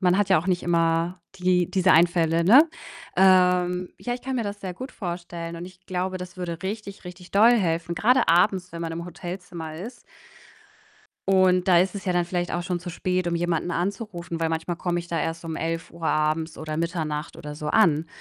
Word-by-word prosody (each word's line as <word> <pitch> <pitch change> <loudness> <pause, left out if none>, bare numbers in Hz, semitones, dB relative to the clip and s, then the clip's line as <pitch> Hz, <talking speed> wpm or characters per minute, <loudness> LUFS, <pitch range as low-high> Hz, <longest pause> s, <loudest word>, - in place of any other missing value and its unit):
man 180 -1 +3
hat 205 -1 +1
ja - - +5
auch 170 - -9
nicht 180 -2 +1
immer 170 +1 +1 0.2
die 180 -1 +1
diese 185 -1 +3
Einfälle, 165 0 +3
ne? 265 - +7 0.5
Ähm, 180 -1 +4
ja, 245 - -2
ich 250 - -9
kann 265 0 -3
mir 235 - -1
das 205 0 -5
sehr 185 -2 -5
gut 260 +9 -8
vorstellen 170 -2 -6
und 170 - -6
ich 185 0 -16
glaube, 185 +1 -2
das 180 0 -9
würde 170 -2 -4
richtig, 200 0 -6
richtig 180 0 -11
doll 215 +4 +6
helfen, 170 -6 0
grade 250 +8 +3
abends, 180 +1 +3
wenn 170 - -6
man 165 -1 -3
im 170 +1 -5
Hotelzimmer 175 -2 -7
ist. 230 +9 -8 1.3
Und 185 -1 +4
da 175 -2 +6
ist 185 +2 0
es 195 - -7
ja 185 - 0
dann 175 0 +2
vielleicht 175 0 -2
auch 175 - -1
schon 175 0 -2
zu 175 +1 -8
spät, 180 +1 -1
um 170 - 0
jemanden 170 0 -1
anzurufen, 175 -2 -3
weil 165 0 0
manchmal 165 +2 -2
komme 175 0 -1
ich 170 - -12
da 170 - -1
erst 165 0 -3
um 160 -1 -4
11:00 165 0 -4
abends 155 +1 0
oder 155 -1 -5
Mitternacht 160 -2 -3
oder 150 -2 -8
so 150 - -6
an. 160 -4 +3
175 Hz, 210 wpm, -25 LUFS, 165-185 Hz, 1.3 s, ne